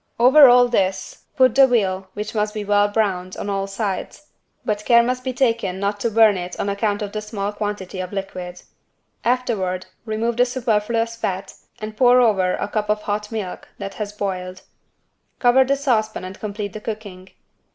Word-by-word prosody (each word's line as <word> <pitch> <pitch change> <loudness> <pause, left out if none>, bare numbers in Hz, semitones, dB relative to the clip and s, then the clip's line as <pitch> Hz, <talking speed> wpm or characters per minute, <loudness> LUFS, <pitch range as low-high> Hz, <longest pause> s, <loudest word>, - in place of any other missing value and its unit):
Over 265 +3 +8
all 245 0 +6
this 190 -5 -1
put 255 -3 +4
the 270 +1 +6
veal 195 -6 0
which 210 +1 -5
must 210 0 -1
be 210 -1 -4
well 205 0 +3
browned 195 -4 -1
on 200 - -3
all 195 0 -2
sides, 200 +8 -4 0.4
but 210 -1 -1
care 235 +1 +5
must 250 +1 -2
be 260 - -2
taken 230 -7 0
not 200 +1 -1
to 235 - 0
burn 220 -2 +5
it 180 0 -6
on 200 - -1
account 205 +1 -1
of 205 - -5
the 215 - -4
small 210 -1 -4
quantity 205 -3 -4
of 185 -1 -4
liquid. 185 -3 -6 0.6
Afterward, 215 -7 -1 0.2
remove 225 +1 -2
the 245 - +5
superfluous 230 -2 0
fat 190 -4 -4 0.2
and 215 0 -7
pour 250 +2 +5
over 195 -6 +3
a - - -3
cup 210 0 -2
of 210 0 0
hot 210 +1 -3
milk, 210 -5 -5
that 195 -1 -6
has 210 -2 -5
boiled. 185 -3 -5 0.7
Cover 250 +1 +5
the 275 +2 +1
saucepan 225 -8 0
and 185 +1 -8
complete 205 -1 -5
the 215 - -7
cooking. 200 -4 -7
210 Hz, 185 wpm, -21 LUFS, 195-230 Hz, 0.7 s, Over